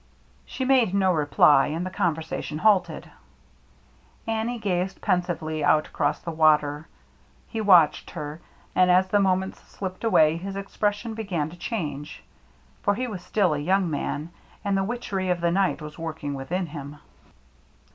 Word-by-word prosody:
She 260 - -4
made 255 -7 +3
no 190 -2 +3
reply, 145 -2 +4
and 165 +4 -3
the 185 - -5
conversation 160 -4 -2
halted. 200 0 +1 1.1
Annie 225 +2 -2
gazed 190 -3 -2
pensively 165 -4 -1
out 155 +1 +3
across 145 - -1
the 170 - -6
water. 155 -1 +2 0.6
He 225 - -4
watched 180 -7 +5
her, 150 +2 -7 0.3
and 185 0 +4
as 185 +1 +4
the 205 - +3
moments 190 -1 0
slipped 185 0 -7
away 160 -8 +4
his 195 +3 -6
expression 205 +3 -2
began 180 -9 -3
to - - -11
change; 165 - -5 0.6
for 205 - +1
he 255 +4 -2
was 200 -6 -6
still 190 -3 +1
a 145 - -2
young 185 +3 +1
man, 150 +2 -3 0.3
and 200 -1 +1
the 195 - +1
witchery 195 -4 -3
of 180 -1 +1
the 170 0 +1
night 190 -3 +1
was 150 +1 -9
working 155 -3 -4
within 160 +8 -3
him. 145 -2 -8
180 Hz, 155 wpm, -25 LUFS, 155-200 Hz, 1.1 s, watched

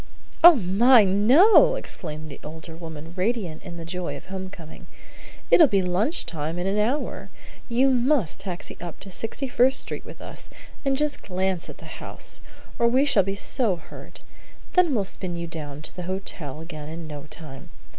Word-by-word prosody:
"Oh, 345 -1 +11
my, 225 +3 +5
no!" 250 - +6
exclaimed 155 - -6
the 140 - -10
older 160 +1 -8
woman, 160 -1 -9
radiant 190 -5 -2
in 175 -3 -9
the 165 - -7
joy 180 +1 -4
of - - -13
home 190 0 -6
coming. 165 -5 -12 0.6
"It'll 320 - +8
be 195 -6 +2
lunch 190 - +1
time 160 +1 -4
in 175 - -2
an 195 +2 0
hour. 245 +8 -1 0.4
You 255 +3 +3
must 250 - +1
taxi 180 -3 -5
up 175 -2 -7
to 195 - -9
Sixty 225 +8 -2
first 260 +2 +3
Street - - -5
with - - -12
us, - - -9 0.3
and 270 -1 +1
just 300 0 0
glance 185 -1 -2
at - - -9
the - - -10
house, - - -5 0.4
or 235 - +4
we 260 +4 +3
shall 225 -8 +5
be 195 +1 -3
so 210 0 +3
hurt. 165 - -10 0.5
Then 350 -7 +4
we'll 205 - +1
spin 185 -2 -3
you 170 0 -4
down 150 -3 -7
to - - -7
the 180 - -5
hotel 165 -6 -4
again 155 -2 -8
in 165 +1 -7
no 150 -2 -8
time. 150 +1 -8
185 Hz, 185 wpm, -24 LUFS, 165-240 Hz, 0.6 s, Oh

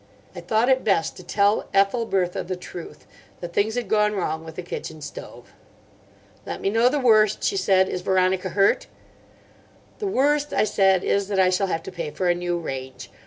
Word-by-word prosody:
I - - -7
thought 225 +2 +1
it 260 0 +3
best 195 -6 +1
to - - -10
tell 205 +1 +1
Ethelbertha 195 -3 +1
the 185 - -2
truth; 180 - -10 0.3
that 175 -1 -7
things 215 +4 +1
had 245 -3 -2
gone 210 0 +2
wrong 160 -5 -2
with 160 -1 -10
the 180 - -6
kitchen 160 -2 -7
stove. 145 -1 -10 0.9
"Let - - -6
me 195 - -1
know 230 +3 +4
the 295 - -1
worst," 215 -5 +3
she 405 - +1
said. 190 - +3
"Is 180 - -4
Veronica 185 0 +1
hurt?" 200 - +2 1.1
"The 415 - -2
worst," 295 -2 +1
I - - +3
said, 195 -3 +2
"is 200 -1 0
that 200 -2 -1
I 185 -1 +4
shall 195 +2 +1
have 165 -3 -2
to - - -8
pay 165 -3 -5
for 165 +5 -2
a - - +5
new 175 0 -2
range. 130 -5 -7
195 Hz, 195 wpm, -23 LUFS, 175-215 Hz, 1.1 s, a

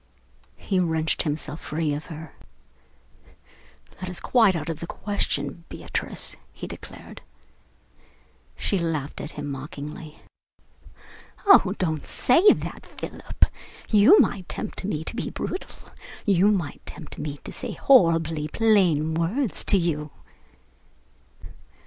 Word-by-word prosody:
He 190 -2 -1
wrenched 160 -3 +1
himself 150 0 -3
free 155 0 -1
from 160 0 -9
her. 160 -2 -10 1.7
"That 185 0 -5
is 180 - -6
quite 220 -7 +4
out 165 - -3
of 165 -2 -3
the 170 - -6
question, 170 -6 -2
Beatrice," - - -3
he - - -8
declared. - - -10 1.4
She 200 - 0
laughed 155 -4 -2
at 150 - -7
him 145 - -5
mockingly. 145 +2 -7 1.3
"Oh, 215 - +6
don't 160 -5 -1
say 345 +11 +5
that, - - -3
Philip! - - -1 0.5
You 220 - +7
might 185 -3 +1
tempt 215 - -4
me 160 -6 -2
to 195 - -4
be - - -2
brutal. 370 - -6 0.3
You 195 -1 +4
might 190 -8 0
tempt 155 - -9
me 145 -1 -4
to - - -8
speak - - -6
horribly 165 - +4
plain 175 -6 +3
words 190 - 0
to 200 - +4
you." 155 -4 -1
165 Hz, 120 wpm, -25 LUFS, 155-200 Hz, 1.7 s, You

